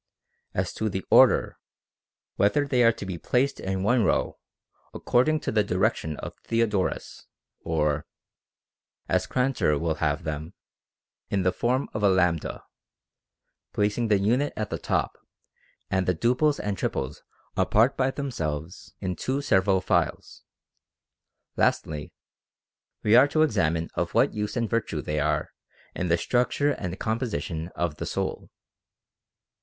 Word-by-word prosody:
As - - -1
to 110 - -1
the 95 -2 -4
order, - - +5 0.8
whether 145 +8 +2
they 125 -3 +2
are 115 - +6
to 105 - -8
be 90 -3 -5
placed 130 +3 0
in 95 0 -2
one 120 +2 +3
row, - - 0 0.6
according 155 +6 +2
to - - -2
the 105 -1 +3
direction 90 -5 0
of - - -7
Theodoras, 110 -5 -1 0.3
or 75 -2 -1 1.0
(as - - +1
Grantor 125 - +1
will 80 +1 0
have 75 +2 0
them) 80 +2 -5 0.7
in 100 -2 0
the 90 - +3
form 130 +3 0
of 110 - -3
a 95 -4 +3
si, - - -6 1.2
placing 105 +3 +1
the 105 -2 +4
unit 120 +9 +1
at 110 -2 -3
the - - -3
top, - - -1 0.7
and 95 -2 +1
the 90 - +2
duples 125 - +2
and 105 -1 -2
triples 70 +1 -3 0.3
apart 115 +6 +3
by 130 0 +1
themselves 85 - -5
in 90 -2 -2
two 130 +8 -2
several 95 -8 +2
files. - - -1 1.2
Lastly, 75 -2 0 0.9
we 105 +1 +5
are 130 +4 +8
to 155 +2 +2
examine 85 - +1
of - - -2
what - - +4
use 105 +2 -3
and 115 -1 0
virtue 110 -9 -2
they 75 0 -2
are - - 0 0.4
in 90 - -2
the 85 0 +3
structure 125 +7 +1
and 90 -8 -4
com 110 +1 -1
position 85 - -3
of 85 -4 -2
the - - -4
soul. - - -3
100 Hz, 140 wpm, -26 LUFS, 85-120 Hz, 1.2 s, are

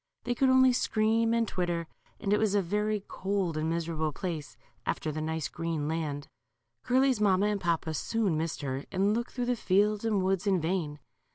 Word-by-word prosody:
They 245 - 0
could 265 +2 +3
only 260 0 +6
scream 225 -1 +2
and 230 -1 +2
twitter, 175 -3 -1 0.3
and 200 -2 0
it 210 - +3
was 215 -2 +2
a 200 - +4
very 210 +3 0
cold 190 -4 -1
and 155 +1 -1
miserable 165 -2 -1
place, 150 - -5 0.3
after 155 - -2
the 155 +1 -4
nice 160 -2 -2
green 165 -3 -3
land. 150 -3 -3 0.3
'. 120 0 -53
Curly's 260 -2 +3
mamma 195 -1 +4
and 210 -1 0
papa 165 -2 0
soon 205 +2 0
missed 160 +1 -2
her, 135 0 -3
and 195 +2 +2
looked 235 +2 -2
through 245 -1 -2
the 245 0 +1
fields 205 0 +2
and 210 -4 +1
woods 190 +1 0
in 190 -2 +3
vain. 160 -3 -1
185 Hz, 195 wpm, -29 LUFS, 160-215 Hz, 0.3 s, only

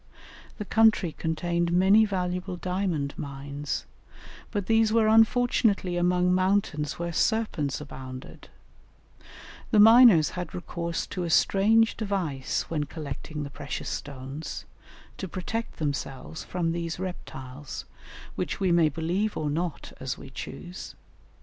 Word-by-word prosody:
The 210 - -5
country 220 -5 +4
contained 170 +2 -1
many 195 +5 +5
valuable 180 -2 -2
diamond 180 -6 -1
mines, 140 0 -4 0.6
but 205 -4 -2
these 225 +1 +3
were 225 -1 +4
unfortunately 225 -4 +3
among 180 +1 +2
mountains 185 -6 +1
where 170 0 -3
serpents 175 - 0
abounded; 130 -3 -9 1.2
the 215 - +4
miners 225 - +8
had 180 -3 -5
recourse 170 -1 -3
to 185 - -4
a 170 - -2
strange 220 +7 +4
device 185 - -1
when 150 -3 -1
collecting 150 0 -6
the 140 - -7
precious 140 0 -5
stones, 140 +2 -6 0.5
to 190 - -4
protect 220 +6 -4
themselves 145 0 -4
from 170 -2 -1
these 170 0 -3
reptiles, 145 -7 -7 0.5
which - - -3
we 190 -2 +2
may 170 -2 +5
believe 175 +8 -1
or 150 -1 -1
not 165 +1 -3
as 130 0 -3
we 135 - -11
choose. 175 +9 -8
175 Hz, 125 wpm, -27 LUFS, 150-200 Hz, 1.2 s, miners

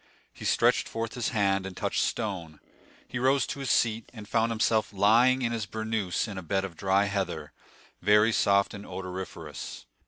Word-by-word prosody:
He - - -9
stretched - - +3
forth 115 0 -4
his 120 -2 -1
hand, 100 -3 +1
and 95 - -9
touched - - 0
stone; 90 -9 -3 0.5
he 125 - -4
rose 130 0 +3
to - - -5
his 135 -2 -3
seat, 115 -1 +1
and 110 -4 -10
found 115 +1 +1
himself 110 -1 +1
lying 120 +6 +4
on 115 - 0
his 110 -3 -3
bournous 110 -3 -2
in 100 -3 -5
a - - -6
bed 95 +3 -1
of 90 -3 -8
dry 95 +3 +2
heather, 90 -6 -3 0.5
very 105 +3 +5
soft 100 -2 +3
and 100 -1 -8
odoriferous. 90 -8 -7
105 Hz, 180 wpm, -28 LUFS, 95-115 Hz, 0.5 s, very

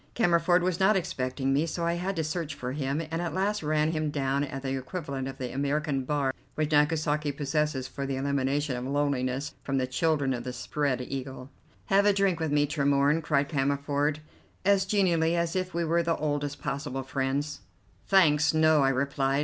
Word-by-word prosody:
Cammerford 175 -4 +3
was 180 -1 0
not 195 +3 +4
expecting 135 -6 -1
me, 150 +4 +2
so 170 +1 -2
I 170 - +1
had 185 +3 -2
to 160 - -1
search 155 -1 -3
for 125 0 -4
him, 140 +2 -2
and 165 +1 -1
at 175 0 -3
last 205 +3 0
ran 155 0 +1
him 155 -2 -1
down 140 -1 0
at 135 -1 -5
the 135 0 -1
equivalent 135 -1 -4
of 135 -1 -7
the 125 -2 -5
American 140 0 -1
bar 140 -1 0 0.2
which 155 0 -1
Nagasaki 150 0 +2
possesses 145 -1 -1
for 140 -1 -5
the 135 - -2
elimination 140 +1 0
of 125 +1 -4
loneliness 140 0 -1
from 135 -1 -2
the 130 - +1
children 140 +1 +1
of 120 -1 -4
the 125 0 -5
Spread 130 +1 -1
Eagle. 130 0 -6 0.3
"Have 200 +1 +3
a 205 - +5
drink 195 -3 +1
with 160 -2 -1
me, 145 0 +3
Tremorne," 145 +1 +2
cried 145 -2 +1
Cammerford, 145 +1 0 0.4
as 200 -1 +4
genially 175 -5 +2
as 170 0 -1
if 185 0 -1
we 170 0 0
were 170 +2 +2
the 165 -1 0
oldest 145 -1 -2
possible 135 -1 -3
friends. 135 +2 -2 0.5
"Thanks, 160 -5 +4
no!" 155 -1 +5
I 135 - +4
replied. 135 +1 0
145 Hz, 190 wpm, -28 LUFS, 135-165 Hz, 0.5 s, a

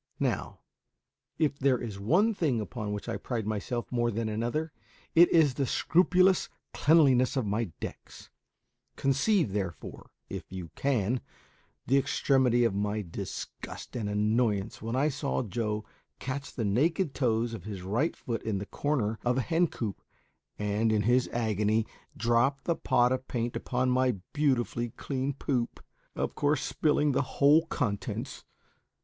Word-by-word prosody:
Now, - - -2 0.8
if 150 -3 0
there 135 -2 +3
is 110 -5 -6
one 180 - +3
thing 150 - 0
upon 105 -1 -4
which 105 -1 -5
I - - -2
pride 115 -4 -3
myself 110 +3 -3
more 120 -1 +1
than 115 0 -2
another, 120 +9 -2 0.4
it 170 +1 +7
is 155 -5 +5
the 135 0 -1
scrupulous 185 +5 +3 0.2
cleanliness 140 -5 +4
of 130 - +1
my 105 +3 0
decks; - - -9 0.6
conceive, 140 - +2
therefore, 95 -5 -5 0.2
if - - -7
you 90 -3 -7
can, 125 -3 0 0.6
the 135 +2 +4
extremity 130 -3 +2
of 115 -4 +2
my 105 +1 -1
disgust 85 +7 -7
and 110 -4 -2
annoyance 105 0 0
when 115 +2 -3
I 140 +3 +3
saw 140 -2 -2
Joe 105 0 -2 0.3
catch 135 +2 -5
the 115 - -3
naked 150 - +1
toes 115 -3 0
of 100 -6 -7
his 100 -4 -6
right 115 - 0
foot 115 -2 -4
in 110 -3 -2
the 100 - -4
corner 115 -5 -1
of 125 +1 +1
a - - +2
hen 170 +6 +2
coop, 110 -9 -5 0.6
and, 105 +2 +1
in 105 -1 +2
his 125 +2 +3
agony, 110 -1 +1 0.3
drop 120 +5 +2
the 170 - +1
pot 125 -4 +2
of 130 0 -2
paint 120 -1 -2
upon 125 0 0
my 130 -1 +2 0.2
beautifully 125 -5 +1
clean 135 0 -2
poop, 125 -3 -2 0.4
of - - -2
course 145 -1 +1
spilling 150 -1 +2
the 135 - +2 0.2
whole 150 +4 +5
contents. 105 -10 -3
120 Hz, 150 wpm, -29 LUFS, 110-140 Hz, 0.8 s, it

